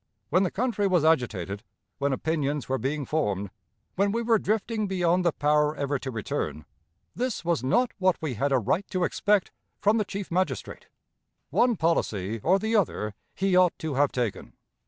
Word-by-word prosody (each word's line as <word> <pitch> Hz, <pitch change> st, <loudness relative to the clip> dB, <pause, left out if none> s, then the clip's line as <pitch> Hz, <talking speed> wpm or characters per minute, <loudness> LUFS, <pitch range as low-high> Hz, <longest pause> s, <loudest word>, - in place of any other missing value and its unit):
When 180 Hz, +4 st, +3 dB
the 190 Hz, -, +2 dB
country 220 Hz, -2 st, 0 dB
was 180 Hz, -5 st, +2 dB
agitated, 105 Hz, -, +1 dB, 0.4 s
when 140 Hz, 0 st, +1 dB
opinions 145 Hz, 0 st, -1 dB
were 135 Hz, 0 st, -1 dB
being 140 Hz, +4 st, -2 dB
formed, 100 Hz, -11 st, -1 dB, 0.4 s
when 200 Hz, +1 st, +2 dB
we 230 Hz, +2 st, -1 dB
were 225 Hz, -1 st, +3 dB
drifting 215 Hz, +1 st, -1 dB
beyond 180 Hz, -1 st, +1 dB
the 170 Hz, -, +3 dB
power 150 Hz, 0 st, +2 dB
ever 140 Hz, -1 st, -1 dB
to 130 Hz, -, -5 dB
return, 105 Hz, -9 st, -3 dB, 0.5 s
this 250 Hz, -7 st, -3 dB
was 165 Hz, -7 st, +1 dB
not 240 Hz, -, +2 dB
what 185 Hz, -1 st, +2 dB
we 155 Hz, -5 st, -3 dB
had 140 Hz, +6 st, -1 dB
a 135 Hz, -, +4 dB
right 160 Hz, -, 0 dB
to 185 Hz, -3 st, -1 dB
expect 205 Hz, +1 st, +1 dB, 0.3 s
from 210 Hz, +2 st, +3 dB
the -, -, +2 dB
Chief 195 Hz, -1 st, -6 dB
Magistrate. 185 Hz, +2 st, -2 dB, 0.6 s
One 245 Hz, -1 st, +3 dB
policy 115 Hz, -, 0 dB
or 185 Hz, -, +4 dB
the 220 Hz, +3 st, -1 dB
other 110 Hz, -, 0 dB, 0.2 s
he 195 Hz, -1 st, +1 dB
ought 180 Hz, -1 st, +4 dB
to 160 Hz, -2 st, -4 dB
have 140 Hz, +1 st, +2 dB
taken. 120 Hz, -5 st, -3 dB
165 Hz, 175 wpm, -27 LUFS, 135-195 Hz, 0.6 s, a